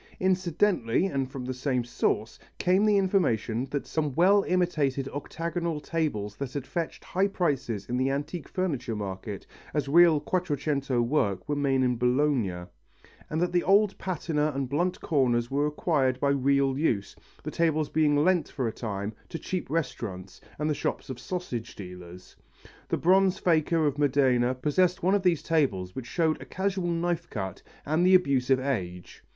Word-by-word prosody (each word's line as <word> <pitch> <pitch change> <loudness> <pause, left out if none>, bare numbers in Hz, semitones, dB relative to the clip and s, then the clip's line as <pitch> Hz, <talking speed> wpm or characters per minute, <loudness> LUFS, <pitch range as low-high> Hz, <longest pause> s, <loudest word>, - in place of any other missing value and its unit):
Incidentally 185 - +1
and 135 -8 -1
from 130 -2 -6
the 130 - -3
same 125 -1 -1
source 115 -2 -1 0.2
came 185 +3 +3
the 210 -1 +4
information 130 - +1
that 145 0 -3
some 150 -4 -2
well 195 +4 +5
imitated 150 -7 +1
octagonal 165 +3 -3
tables 145 -11 -2
that 140 -3 -4
had 140 -3 -4
fetched 170 +2 -4
high 190 +2 +1
prices 140 - -1
in 125 - -1
the 130 +1 +1
antique 145 +5 -3
furniture 145 - -2
market 100 0 -5 0.3
as 145 -2 0
real 165 +1 +6
Quattrocento 145 -5 -1
work 105 -8 0
were 145 - 0
made 135 -2 +1
in 125 -1 +1
Bologna, 125 -7 +1 0.7
and 155 - -1
that 175 +1 +1
the 175 0 +2
old 200 +1 +4
patina 155 -4 -1
and 135 -1 -1
blunt 175 +6 0
corners 120 -6 +1
were 145 +2 +1
acquired 145 -4 0
by 140 - +1
real 140 0 +2
use, 110 -11 0 0.3
the - - -4
tables 155 -2 +1
being 150 -2 +2
lent 165 +2 +2
for 130 -4 -2
a - - -1
time 105 -2 -4 0.2
to 165 - -4
cheap 185 -1 -4
restaurants 100 - -4 0.2
and 150 - -1
the 155 - +2
shops 135 - -3
of 125 - -7
sausage 130 -8 -5
dealers. 90 -1 -10 0.5
The - - +1
bronze 190 +2 +4
faker 165 -1 +2
of 145 -1 0
Modena 130 -3 +3
possessed 175 +7 +1
one 190 +2 +3
of 205 - +3
these 180 -4 +2
tables 100 - 0
which 130 -2 -6
showed 160 -2 0
a - - -8
casual 190 -2 -2
knife 170 0 -1
cut 95 -4 -5 0.2
and 155 +4 +1
the 185 +1 +6
abuse 140 -8 +2
of 135 -1 +4
age. 95 -10 -4
145 Hz, 170 wpm, -27 LUFS, 125-170 Hz, 0.7 s, real